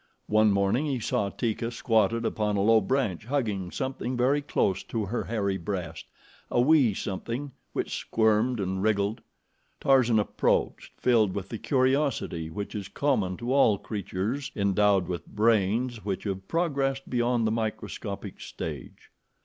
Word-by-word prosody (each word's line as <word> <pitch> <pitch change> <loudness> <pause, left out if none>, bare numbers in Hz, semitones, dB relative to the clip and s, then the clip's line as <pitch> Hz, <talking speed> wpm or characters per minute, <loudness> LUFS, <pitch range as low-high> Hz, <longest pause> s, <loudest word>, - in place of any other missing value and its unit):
One 110 0 +4
morning 100 +9 +1
he 135 -4 -1
saw 105 -2 0
Teeka 115 +2 -2
squatted 115 -1 +1
upon 105 -2 0
a 100 - +2
low 110 +1 +5
branch 105 -4 -1
hugging 110 -9 -1
something 130 +1 -3
very 135 +4 +2
close 95 -9 0
to 110 -3 -2
her 115 +5 -3
hairy 100 -4 -1
breast 85 -3 -4 0.4
a - - +1
wee 130 -5 +4
something 115 +10 -4 0.2
which - - -2
squirmed 110 +2 +1
and 95 -1 -2
wriggled. 105 +2 +1 0.6
Tarzan 130 -4 +4
approached 105 - 0
filled 110 -6 +3
with 100 -1 -4
the 115 - -5
curiosity 130 - 0
which 100 +5 -5
is 100 -3 -4
common 105 -7 0
to 120 +2 -2
all 115 -7 +5
creatures 105 +7 -3
endowed 100 -2 +2
with 85 -3 -4
brains 110 +2 +1
which 95 -3 -3
have 95 -2 -4
progressed 135 -5 0
beyond 120 -1 +1
the 110 - +1
microscopic 110 -1 -4
stage. 75 -5 -7
110 Hz, 145 wpm, -27 LUFS, 100-125 Hz, 0.6 s, low